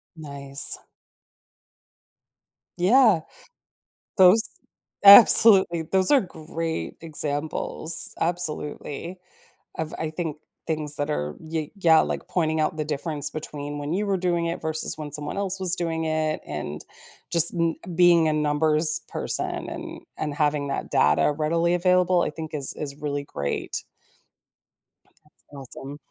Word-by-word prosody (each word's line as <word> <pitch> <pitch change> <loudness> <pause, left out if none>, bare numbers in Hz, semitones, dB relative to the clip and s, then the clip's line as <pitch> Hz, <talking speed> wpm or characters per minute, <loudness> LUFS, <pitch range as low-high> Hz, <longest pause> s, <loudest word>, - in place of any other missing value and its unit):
Nice. 140 -3 -4 2.0
Yeah. 205 0 +5 1.0
Those 190 +3 +7 0.6
Absolutely, 200 -4 +8
those 185 +3 +1
are 280 -3 +6
great 165 -2 -5
examples- 155 +1 -3
absolutely- 170 0 -4 0.6
of 160 -1 -4
I 160 - -3
think, 160 -2 -4 0.3
things 155 -2 -3
that 145 - -2
are 75 - -3
ye 160 -1 -4
yeah, 165 -5 +5
like, - - -3
pointing 160 -3 0
out 155 - 0
the 155 - -2
difference 150 0 -3
between 145 -1 -6
when 145 +1 -4
you 205 +4 -1
were 195 -1 +1
doing 175 -2 0
it 170 - -3
versus 160 0 -3
when 150 -2 -7
someone 150 +3 -5
else 195 -1 -2
was 185 -1 +1
doing 165 -2 -2
it 155 -1 -1
and, 75 0 -6 0.5
just 170 +1 +2
n 165 -1 0 0.2
being 170 -1 +5
a - - +1
numbers 155 +1 +1
person - - -3
and - - -7 0.2
and 150 -2 -3
having 150 -1 0
that 140 - -4
data 75 - +3
readily 165 +3 0
available, 180 0 +3
I - - -1
think, 160 +1 -8
is 140 -3 -2
is 140 -2 -6
really 145 -1 -3
great. 70 - -4 1.4
That's 150 - -30 0.2
awesome. 135 +1 -9
160 Hz, 130 wpm, -24 LUFS, 150-175 Hz, 2.0 s, Absolutely